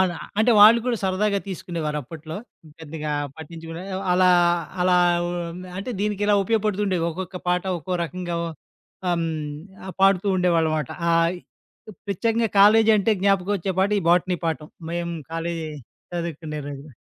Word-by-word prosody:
అలా. 175 -4 +1 0.2
అంటే, 220 +3 +4
వాళ్ళు 220 +3 +9
కూడా 240 -2 +1
సరదాగా 200 +2 +1
తీసుకునేవారు 165 -4 -3
అప్పట్లో. 160 +4 -8 0.4
పెద్దగా 155 -1 -5 0.2
పట్టించుకునే 165 +1 -8 0.3
అలా 185 0 +5 0.5
అలా 180 0 +4 0.3
ఉండి 175 +1 -5
అంటే 225 +6 -4
దీనికి 205 -1 -1
ఇలా 205 - +4
ఉపయోగపడుతూండేవి. 205 -4 0
ఒక్కొక్క 180 +2 -6
పాట 180 0 +2 0.2
ఒక్కో 180 +3 -3
రకంగా 175 0 -4 0.7
ఆహ్, 175 - +2
హ్మ్. 165 - -1 0.6
ఆ! - - -7
పాడుతూ 195 0 +4
ఉండేవాళ్ళమాట. 160 -5 +1 0.2
ఆహ్, 165 0 +3 0.6
ఈ - - -11 0.2
ప్రత్యేకంగా 225 +3 0
కాలేజీ 220 +2 +7
అంటే 215 +2 +2
జ్ఞాపకం 195 0 +2
వచ్చే 190 +1 -3
పాట 200 +2 +2
ఈ - - -6
బోటనీ 180 +1 +2
పాఠం, 155 -1 -3 0.2
మేము 170 0 -2 0.2
కాలేజీ 165 -1 -3 0.4
చదువుకునే 160 -3 -4
రోజులో. 140 -1 -9
180 Hz, 140 wpm, -23 LUFS, 165-195 Hz, 0.7 s, వాళ్ళు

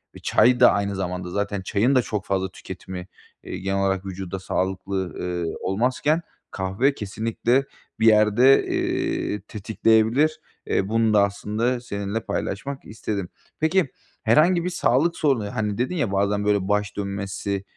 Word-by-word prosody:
ve - - -10
çay 125 0 +3
da 120 - +8
aynı 100 -1 -1
zamanda 90 -1 -3
zaten 100 +1 -2
çayın 110 +8 +1
da 130 - +5
çok 105 -4 -4
fazla 95 -1 -1
tüketimi, 95 0 -8 0.4
eee, - - -6
genel 95 +1 -2
olarak 95 -1 0
vücuda 95 0 -5
sağlıklı, 95 +1 -2 0.2
ııı, 85 -2 -2
olmazken, 130 - +1 0.3
kahve 95 +9 0
kesinlikle 115 +5 0 0.3
bir 110 - +4
yerde, 110 +5 +5
eee, 105 - -1
tetikleyebilir. 110 +8 +2 0.3
Eee, 95 - 0
bunu 115 0 +2
da 105 -1 +6
aslında 105 +5 -1
seninle 100 -1 -3
paylaşmak 105 +7 -4
istedim. 105 -3 -4 0.3
Peki, 160 0 +2 0.3
herhangi 165 +10 +4
bir 180 - -1
sağlık 165 -1 +1
sorunu, 125 -7 0
hani, 105 -3 -1
dedin 125 +9 -1
ya, 145 - 0
"Bazen 100 +1 +1
böyle 100 -2 +1
baş 105 0 0
dönmesi 100 0 -3
105 Hz, 145 wpm, -24 LUFS, 95-125 Hz, 0.4 s, da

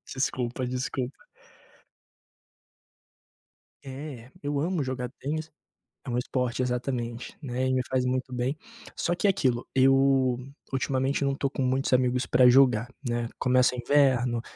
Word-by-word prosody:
Desculpa, 130 -1 -1
desculpa. 130 +1 -3 2.6
É, 135 -2 -8
eu 145 0 -1
amo 165 +2 0
jogar 130 -2 -3
tênis. 155 +3 -4 0.6
É - - -5
um 120 - -1
esporte, 125 0 -1
exatamente, 125 -1 -3
né. 130 -2 -2
E 130 - +1
me 130 - +2
faz 130 -1 +1
muito 130 0 -2
bem. 125 +4 -1 0.4
Só 175 - 0
que 190 - -3
aquilo, 130 -11 +1
eu 135 -1 +4 0.4
ultimamente 135 +1 0
não 140 - +2
estou 135 0 -1
com 140 - -4
muitos 130 +1 +1
amigos 125 0 +2
para 125 -1 +5
jogar, 125 -2 +4 0.2
né. 120 -1 -1
Começa 125 0 +3
o - - -7
inverno, 125 -3 +2
130 Hz, 135 wpm, -27 LUFS, 125-135 Hz, 2.6 s, para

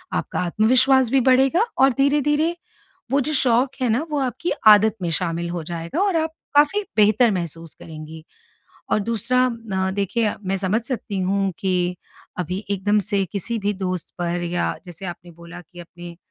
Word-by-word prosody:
आपका - - -2
आत्मविश्वास 250 +7 +3
भी 270 -1 +4
बढ़ेगा 265 - +4
और 270 0 +5
धीरे-धीरे 295 +4 +2 0.6
वो 275 - +3
जो 305 +4 -2
शौक 255 -1 +3
है 250 - +1
ना 245 +8 +1
वो 295 - 0
आपकी 265 +6 -2 0.2
आदत 215 0 +7
में 175 - -1
शामिल 170 +1 -2
हो 170 -1 -4
जाएगा 170 - -4
और 395 -3 +1
आप 320 0 -1 0.2
काफ़ी 300 +9 +4
बेहतर 215 +3 +4
महसूस 165 -3 -5
करेंगी। 155 0 -10 0.7
और - - +3
दूसरा 230 +4 0
अ, 215 -6 -3
देखिए 205 +3 -1
मैं 190 +1 -1
समझ 195 +4 0
सकती 225 -5 -4
हूँ 195 +1 0
कि 180 -2 0 0.4
अभी 180 +4 -3
एकदम 205 +1 +1
से 200 -2 +1
किसी 225 +4 -2
भी 205 0 -1
दोस्त 185 -3 -4
पर 175 0 -2
या 175 0 -1
जैसे 175 +2 -8
आपने 175 0 -8
बोला 170 +1 -11
कि 175 +1 -14
अपने 175 0 -11
200 Hz, 170 wpm, -22 LUFS, 175-255 Hz, 0.7 s, आदत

